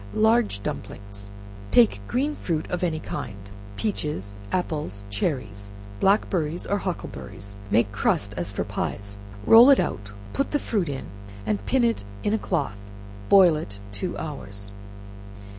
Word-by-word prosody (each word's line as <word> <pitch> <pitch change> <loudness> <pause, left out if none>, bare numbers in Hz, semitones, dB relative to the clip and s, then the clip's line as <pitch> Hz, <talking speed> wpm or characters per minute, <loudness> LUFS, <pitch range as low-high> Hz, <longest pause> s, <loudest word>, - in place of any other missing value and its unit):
Large 220 - +3
Dumplings. 100 0 -6 0.4
Take 100 -2 +5
green 280 +5 +1
fruit 160 - -2
of 180 - -1
any 160 -3 0
kind 100 -8 -5 0.4
peaches, 150 - -2 0.2
apples, 150 - -2
cherries, 100 - -2 0.3
blackberries, 180 -5 +2
or 200 - 0
huckleberries, 100 - -6
make 105 -1 +3
crust 100 0 +1
as 85 +3 -2
for 100 - -1
pies, 100 0 -4 0.3
roll 235 +4 +9
it 275 - +7
out, 100 +3 -2 0.2
put 275 - +1
in - - -14
the - - +5
fruit, 205 - -1
and 100 - -5
pin 260 -2 +3
it 230 - +1 0.2
in 205 - +1
a 220 - +2
cloth, 140 - -1 0.5
boil 185 -5 +8
it 100 -10 -5
two 175 - -3
hours. 100 -9 -6
125 Hz, 140 wpm, -25 LUFS, -, 0.5 s, roll